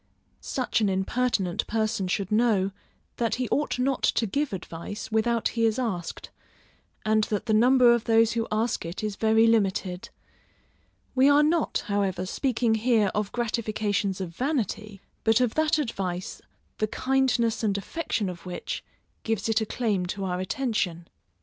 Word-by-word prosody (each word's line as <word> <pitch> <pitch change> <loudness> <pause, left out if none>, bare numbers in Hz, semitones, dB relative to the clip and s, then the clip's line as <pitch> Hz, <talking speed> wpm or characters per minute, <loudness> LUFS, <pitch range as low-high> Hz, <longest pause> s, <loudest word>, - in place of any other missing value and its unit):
Such 250 -3 -1
an 205 - +3
impertinent 190 0 0
person 215 -3 -1
should 195 +1 -2
know, 210 -4 +2 0.5
that 230 -2 0
he 250 0 -2
ought 295 - 0
not 260 +1 0
to 230 - +2
give 280 +7 -1
advice 190 +3 -6
without 230 +1 +1
he 230 - -1
is 225 0 +2
asked, 195 -9 -4 0.7
and 215 0 +3
that 210 - -2
the 220 - +1
number 245 +2 +6
of 235 -1 0
those 225 -1 +4
who 230 -1 -1
ask 220 +2 0
it 170 +5 -6
is 210 -2 -2
very 220 +1 +4
limited: 195 -5 +1 1.0
we 265 +2 +5
are 290 +1 +6
not, 320 +1 +1
however, 195 -3 -1
speaking 235 +2 0
here 220 -2 +2
of 210 -1 -1
gratifications 215 -4 -1
of 175 -3 -5
vanity, 215 - -2 0.2
but 225 +1 +4
of 245 -3 +1
that 315 0 +2
advice, 190 - -3 0.4
the 215 - +1
kindness 245 -2 +1
and 200 -2 +1
affection 215 - -2
of 175 -2 -7
which, 180 -1 -5 0.4
gives 225 -2 -1
it 225 0 +2
a 220 - -2
claim 205 -7 -1
to 195 +2 -4
our 180 -1 -2
attention. 185 -5 -2
220 Hz, 155 wpm, -26 LUFS, 195-240 Hz, 1.0 s, number